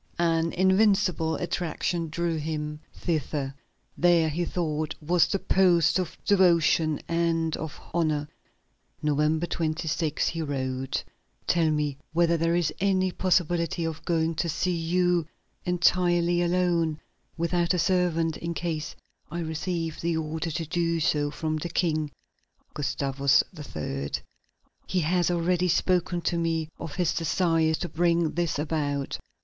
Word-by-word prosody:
An 165 -1 +2
invincible 190 -3 +3
attraction 175 -1 -2
drew 170 +1 -1
him 150 -1 -3
thither. 145 -4 -2 0.4
There, 170 -2 +4
he 170 +3 -1
thought, 155 -3 -2
was 170 +2 +3
the - - 0
post 185 -3 +3
of 180 -2 -4
devotion 170 -5 +4
and 165 -1 +1
of 160 -1 -6
honor. 155 -3 +1 0.8
November 150 +2 +2
26, 160 -2 -1
he 165 - -3
wrote: 130 -3 -2 0.4
"Tell 165 -2 +2
me 150 -2 -1
whether 170 0 +3
there 165 +1 +1
is 175 -3 +1
any 185 -1 +2
possibility 175 -2 +1
of 160 -1 -4
going 165 -1 +1
to 170 - 0
see 180 +3 0
you 175 0 +1 0.4
entirely 175 0 +3
alone, 170 -3 +1 0.4
without 170 +1 +1
a - - 0
servant, 170 -3 +1
in 170 0 -4
case 160 -3 -3 0.3
I 170 +2 -4
receive 165 0 -3
the 170 -1 0
order 160 +1 -3
to 165 +1 -3
do 170 +1 0
so 150 -2 +1
from 155 +1 -2
the 170 +3 -4
King 155 -3 0 0.6
(Gustavus 140 -1 +2
III.); 75 - -5 0.8
he 185 - +1
has 175 +2 +2
already 175 +1 +1
spoken 175 0 +1
to 170 0 0
me 165 -2 -1
of 165 -3 -6
his 175 -3 +1
desire 165 -1 +2
to 175 - -4
bring 170 0 +1
this 170 -3 -1
about." 145 -2 -2
165 Hz, 130 wpm, -27 LUFS, 155-175 Hz, 0.8 s, There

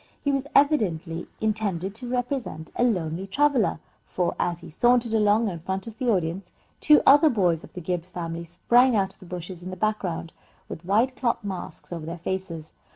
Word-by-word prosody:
He 285 - +2
was 275 0 -1
evidently 185 - +2
intended 205 -4 -1
to 245 +3 -7
represent 245 - -3
a - - +1
lonely 180 -5 0
traveller, 260 - +2 0.2
for, 180 -2 -1
as 175 0 -1
he - - -11
sauntered 240 +5 +3
along 215 +1 +3
in 175 -4 -4
front 190 +3 -4
of 230 0 -10
the 255 -2 0
audience, 180 -2 -1 0.3
two 300 0 +5
other 290 +3 +7
boys 180 - +1
of - - -13
the 180 - -7
Gibbs 175 +1 -3
family 170 -2 -5
sprang 240 +9 +3
out 195 -2 +1
of - - -29
the 185 - -13
bushes 180 0 -7
in 180 - -7
the 185 - -5
background, 185 -6 -2 0.3
with 165 - -8
white 225 +7 +2
cloth 240 -3 -1
masks 190 -2 -6
over 160 -2 -6
their 170 +1 -5
faces. 170 -2 -5
190 Hz, 190 wpm, -25 LUFS, 170-235 Hz, 0.3 s, other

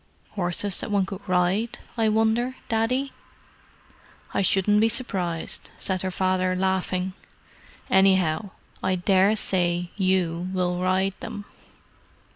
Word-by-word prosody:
"Horses 185 0 0
that - - -4
one 200 -2 +2
could 195 +1 -7
ride, 185 +6 +1 0.2
I 225 -2 +2
wonder, 225 +4 +1
Daddy?" 250 +5 0 1.2
"I - - +1
shouldn't 200 +2 +3
be 225 - +4
surprised," 180 -9 -2
said 185 -2 -1
her 190 - -2
father, 185 0 0
laughing. 190 0 -1 0.7
"Anyhow, 190 -1 +3 0.3
I 185 - +1
daresay 185 -2 +2
you 185 -3 0
will 180 -1 0
ride 185 +1 +1
them." 205 - -7
190 Hz, 110 wpm, -25 LUFS, 180-210 Hz, 1.2 s, be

